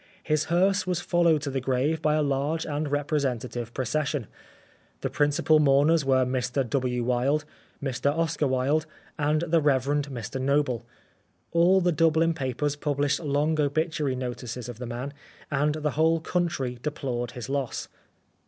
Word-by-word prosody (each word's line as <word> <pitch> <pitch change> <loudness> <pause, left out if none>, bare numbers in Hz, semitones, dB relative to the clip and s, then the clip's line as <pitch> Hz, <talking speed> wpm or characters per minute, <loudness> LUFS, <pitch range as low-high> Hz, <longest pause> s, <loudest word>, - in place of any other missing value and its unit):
His 155 0 +1
hearse 185 +3 +2
was 180 -2 0
followed 170 -4 +2
to 140 - -2
the 135 0 -2
grave 135 +5 0
by 155 -1 +2
a 155 - +2
large 145 +3 0
and 150 0 -2
representa 140 -4 -1
tive 120 -1 -6
procession. 135 0 -1 0.8
The - - -2
principal 145 +1 +3
mourners 150 +2 +4
were 130 -1 +3
Mr 125 +1 -1
W. 125 -1 0
Wilde, 130 +5 +1 0.4
Mr 135 0 0
Oscar 160 -1 0
Wilde, 135 +4 +1 0.3
and 150 +1 +2
the 170 -1 +2
Rev. 135 -3 +2
Mr 135 -4 -2
Noble. 130 -4 0 0.6
All 175 +3 +4
the 175 0 +2
Dublin 165 +1 +3
papers 140 0 -2
published 145 -1 0
long 150 +1 0
obituary 150 -1 0
notices 125 -1 -5
of 120 -2 -8
the 125 - -5
man, 125 +4 -5 0.4
and 145 +1 +1
the 150 -1 -1
whole 160 +3 +2
country 160 -8 -2
deplored 125 -5 -3
his 125 -1 -6
loss. 135 -2 -2
145 Hz, 155 wpm, -26 LUFS, 130-155 Hz, 0.8 s, mourners